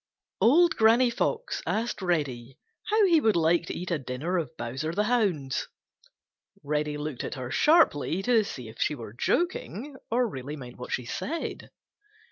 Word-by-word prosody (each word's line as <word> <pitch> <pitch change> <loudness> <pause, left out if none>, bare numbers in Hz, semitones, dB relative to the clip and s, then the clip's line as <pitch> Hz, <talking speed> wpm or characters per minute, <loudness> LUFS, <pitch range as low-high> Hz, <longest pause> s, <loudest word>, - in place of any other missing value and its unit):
Old 335 +9 +5
Granny 235 +3 +5
Fox 460 - -1
asked 225 -1 -1
Reddy 135 -9 -2 0.3
how 435 -1 +4
he 335 -4 +4
would 220 -5 +3
like 170 +1 +2
to - - -4
eat 180 +1 -5
a 165 - +1
dinner 140 +8 -2
of 155 -7 -6
Bowser 130 +7 -3
the 205 +4 +1
Hound's, 200 - 0 1.0
Reddy 150 0 -1
looked 150 -3 -4
at - - -4
her 130 -2 -6
sharply 195 - +3
to 235 -2 +4
see 125 - -7
if 110 - -12
she 150 - +1
were 115 -5 -9
joking 295 - -1
or 245 +1 +2
really 140 - -6
meant 125 -4 -10
what 125 - -7
she 125 - -2
said. 325 - -4
170 Hz, 165 wpm, -27 LUFS, -, 1.0 s, Old